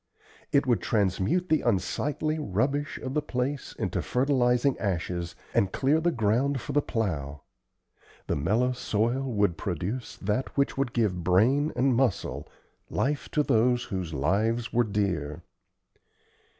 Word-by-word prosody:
It 140 0 +3
would 120 -2 +2
transmute 105 - +1
the 155 - +3
unsightly 145 - 0
rubbish 140 +5 -1
of 130 - -3
the 150 - +1
place 130 +1 -3
into - - -1
fertilizing 125 0 +2
ashes, 85 -3 -2 0.2
and 95 - +2
clear 145 +4 +2
the 175 - +2
ground 125 +2 +1
for - - -6
the 145 - +3
plow. 75 - -3 0.8
The - - -1
mellow 110 - +1
soil 120 +1 0
would 100 -6 +1
produce 100 - -3
that 105 +9 -2
which 140 - +2
would 135 -2 -1
give 100 -7 0
brain 125 - +3
and 130 -1 +2
muscle 130 0 0 0.4
life 145 +1 -1
to 150 - +3
those 125 -1 +2
whose 95 -4 -4
lives 105 - 0
were 120 0 +4
dear. 90 -7 -2
120 Hz, 135 wpm, -27 LUFS, 95-135 Hz, 0.8 s, were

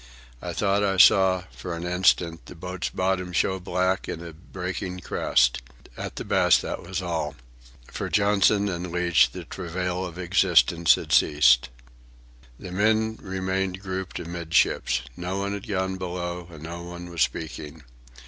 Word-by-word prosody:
I - - -4
thought 100 0 +1
I 95 -1 +1
saw, 95 0 +6
for 90 -2 -6
an 85 - -6
instant, 90 -2 +1
the - - -10
boat's 90 +2 -4
bottom 90 -1 -1
show 95 +2 +1
black 95 +1 -1
in 85 +1 -5
a 85 - -8
breaking 90 +2 -6
crest. - - +2 0.3
At - - -6
the - - -5
best, - - +4
that - - -4
was 95 +1 -4
all. 80 -4 -2 0.5
For - - -5
Johnson 100 0 +3
and 90 -2 -4
Leach 90 -1 +3
the - - -8
travail 90 0 -3
of 90 -2 -7
existence 85 -3 +4
had - - -7
ceased. 60 -5 +5 0.9
The 90 - -9
men 110 +3 +1
remained 95 0 -2
grouped 95 -1 -5
amidships. 85 -7 0
No 90 +2 -4
one 100 +1 -2
had 100 +2 -6
gone 95 -2 -1
below, 90 -1 -4
and 80 -3 -12
no 85 +1 -6
one 85 0 -8
was 85 - -3
speaking. 80 -1 -3
90 Hz, 155 wpm, -25 LUFS, 85-95 Hz, 0.9 s, saw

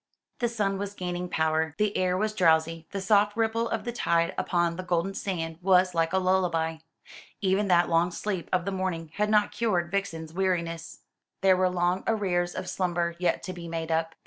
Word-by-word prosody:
The 240 - +1
sun 200 -4 -1
was 200 0 -4
gaining 180 -1 -4
power, 160 -1 0
the 210 -1 0
air 185 0 +1
was 215 +2 0
drowsy, 165 -3 +2
the 200 - -4
soft 205 +2 +3
ripple 230 +1 +1
of 225 - -2
the 240 - -3
tide 170 -7 +1
upon 170 -1 0
the 185 - -4
golden 180 +1 -1
sand 165 -5 -4
was 185 0 +4
like 165 -1 +1
a 190 - +2
lullaby. 180 -4 +1 0.6
Even 195 +1 +1
that 175 -2 +4
long 170 +1 +2
sleep 185 -1 -4
of 180 -1 +1
the 200 - -1
morning 180 -4 -3
had 210 0 +1
not 210 -1 +3
cured 180 -7 0
Vixen's 165 -5 -3
weariness. 170 -3 -2 0.4
There 190 -1 +5
were 185 0 +2
long 180 +1 0
arrears 180 -5 0
of - - -4
slumber 175 -2 -1
yet 180 - 0
to 185 +2 -5
be 175 -1 -8
made 165 0 -4
up. 160 0 0
180 Hz, 195 wpm, -27 LUFS, 170-195 Hz, 0.6 s, There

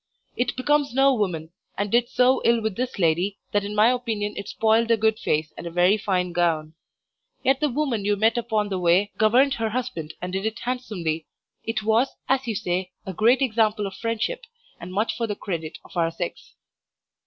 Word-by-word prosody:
It 245 0 -1
becomes 285 0 +1
no 270 0 +5
woman, 175 -8 -2 0.3
and 205 0 -2
did 240 0 +3
so 255 +1 +3
ill 235 0 +4
with 220 -3 -2
this 255 +3 -3
lady 180 +3 +1
that 205 -1 +1
in 205 +1 -5
my 215 +3 +5
opinion 225 -5 -2
it - - -6
spoiled 225 +1 +2
a 230 - +4
good 220 0 +1
face 155 0 -1
and - - -7
a - - -3
very 180 +4 +4
fine 185 -4 -1
gown. 165 -3 0 0.7
Yet 270 0 +3
the 300 - +1
woman 255 -5 -1
you 205 +1 +2
met 220 +3 +2
upon 220 -3 0
the 190 -2 -2
way 180 +4 +3
governed 250 +6 +4
her 225 -4 -1
husband 175 -10 -4
and 180 +1 -5
did 190 +1 -2
it 220 +1 -4
handsomely. 195 -11 -3 0.4
It 225 -1 -2
was, 225 +5 +2
as 265 -1 +1
you 225 - -1
say, 185 -2 -2
a 190 - -5
great 235 +8 +4
example 220 -4 +1
of 195 - -5
friendship, 230 - -2 0.4
and 175 +2 -8
much 210 +5 0
for 230 - -2
the 205 - -3
credit 165 -6 -5
of - - -15
our 165 -1 +2
sex. 170 +1 -6
215 Hz, 200 wpm, -24 LUFS, 185-240 Hz, 0.7 s, no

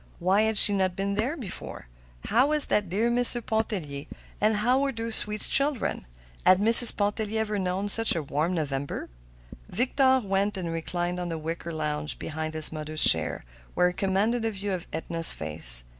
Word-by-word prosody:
Why 190 +4 0
had 220 -1 -1
she 205 - +9
not 190 -2 -2
been 200 +1 -4
there 240 +10 -3
before? 220 - -9 0.4
How 250 +5 +1
was 300 -1 +3
that 205 -4 -2
dear 220 +6 -2
Mr. 245 0 +6
Pontellier 185 -11 -5 0.3
and 215 +1 +1
how 245 +5 0
were 280 -1 -2
those 230 -2 -7
sweet 210 -1 -3
children? 275 - 0 0.4
Had 185 0 +3
Mrs. 230 +3 +8
Pontellier 210 +1 -3
ever 210 -2 -4
known 185 +2 -4
such 225 0 +2
a 165 - -4
warm 155 +6 -3
November? 140 -3 -6 0.6
Victor 260 +4 0
went 195 +1 -3
and 175 -3 -6
reclined 175 +2 -5
on 175 -1 -6
the 165 - -5
wicker 165 +2 -7
lounge 150 -1 -5
behind 155 0 -7
his 155 -1 +5
mother's 155 0 -2
chair, 80 -6 +1 0.3
where 180 - +1
he - - -8
commanded 205 +6 -2
a 225 - -2
view 200 -1 -6
of 180 -2 -7
Edna's 165 +1 +4
face. - - -2
195 Hz, 180 wpm, -24 LUFS, 165-220 Hz, 0.6 s, she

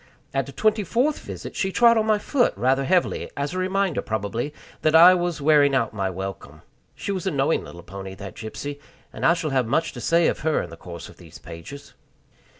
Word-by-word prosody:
At 135 -1 0
the - - -8
twenty 215 +5 +1
fourth 250 - +1
visit - - -8
she 190 - -1
trod 235 +3 +5
on 220 -1 +1
my 215 -1 +4
foot 245 +4 +1
rather 130 +5 +2
heavily, 180 +3 +1
as 140 +3 -2
a 185 - -2
reminder, 190 +1 0
probably, 110 +5 -3 0.3
that 155 0 +3
I 175 +3 +9
was 175 -3 -1
wearing 145 -2 +5
out 115 -4 0
my 100 -3 -1
welcome. 95 +1 -7 0.3
She - - -4
was 190 -1 -3
a - - +1
knowing 140 +2 +1
little 85 0 -11
pony, 95 0 -8
that 100 -2 -8
Gypsy, 140 +8 -6 0.3
and - - -7
I 170 - +5
shall 165 -3 -3
have 130 -3 +1
much 165 +8 +1
to - - -8
say 170 0 +3
of - - +1
her 160 0 +1
in 85 - -9
the - - -8
course 85 -1 -9
of - - -15
these - - -13
pages. 85 +13 -11
145 Hz, 220 wpm, -24 LUFS, 110-185 Hz, 0.3 s, I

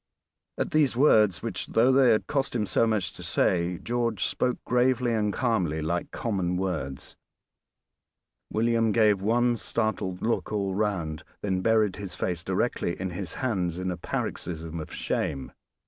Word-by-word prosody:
At - - -2
these 150 -5 +3
words, 110 - +4
which, - - -3
though 120 +4 +4
they 130 -1 +5
had 110 - +3
cost 135 -3 -1
him 110 -3 +1
so 115 - +2
much 110 -4 0
to - - -11
say, 90 0 +1
George 115 -3 -1
spoke 125 -1 0
gravely 125 -1 +2
and 105 -2 +1
calmly 100 - 0
like 85 +3 -2
common 95 -6 -1
words, 75 -9 -4 1.4
William 115 0 +2
gave 105 -4 +4
one 120 +3 +2
startled 110 -6 -2
look 115 +1 0
all 100 -2 -1
round, 95 -7 -1 0.2
then 95 -2 0
buried 110 -2 +2
his 100 -3 -6
face 85 -2 -2
directly 95 -1 -1
in 95 0 -3
his 90 -1 -5
hands 95 -9 -1
in 95 0 -2
a - - -2
paroxysm 80 0 -4
of 80 - -7
shame. 70 - -2
105 Hz, 155 wpm, -27 LUFS, 90-115 Hz, 1.4 s, they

